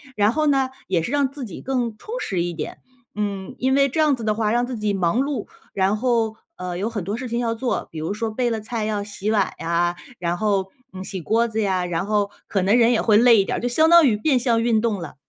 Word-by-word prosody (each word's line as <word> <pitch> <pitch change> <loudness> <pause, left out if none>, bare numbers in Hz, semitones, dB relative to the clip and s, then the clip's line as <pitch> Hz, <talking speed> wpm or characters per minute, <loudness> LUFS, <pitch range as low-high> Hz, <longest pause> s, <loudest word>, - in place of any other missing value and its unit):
然 210 +1 +3
后 310 0 +1
呢， 270 -2 +2 0.2
也 175 -3 +1
是 230 - -4
让 285 -2 +2
自 280 -2 -7
己 195 - -9
更 245 -5 -2
充 475 +3 -6
实 180 -3 -1
一 175 0 -3
点。 - - -6 0.4
嗯， 205 +3 -3
因 260 +1 +1
为 275 0 +4
这 315 - -3
样 300 -3 +4
子 230 - -8
的 215 -1 +1
话 215 -1 0
让 240 +1 +2
自 250 -3 -5
己 210 -1 -1
忙 185 +4 +1
碌， 275 -6 -2 0.3
然 195 +2 +1
后， 230 -2 +1 0.2
呃， 180 -1 -4
有 210 +5 -1
很 205 -5 -3
多 205 +5 -3
事 255 0 -5
情 235 +1 -2
要 230 -1 -1
做， 245 +2 -2
比 160 - -9
如 160 +6 -2
说 225 +1 -2
备 245 +2 0
了 220 -1 -2
菜 220 0 -3
要 210 -2 -1
洗 205 +1 -3
碗 205 -3 +2
呀， 170 +1 0 0.2
然 175 0 -1
后， 195 -2 0 0.2
嗯 185 0 -6
洗 190 -1 -5
锅 230 +8 +2
子 220 0 -3
呀， 190 -3 0
然 175 +1 -2
后 205 -1 +1 0.2
可 195 - 0
能 205 +5 +4
人 235 0 +5
也 230 - +2
会 210 -2 +4
累 235 -2 +6
一 - - -2
点 - - -2
儿， - - -4
就 245 - -1
相 315 +7 +3
当 340 -2 +8
于 215 - +3
变 265 +3 +2
相 230 -2 +2
运 230 -2 +3
动 220 -5 0
了。 160 - -8
220 Hz, 285 characters per minute, -22 LUFS, 195-245 Hz, 0.4 s, 当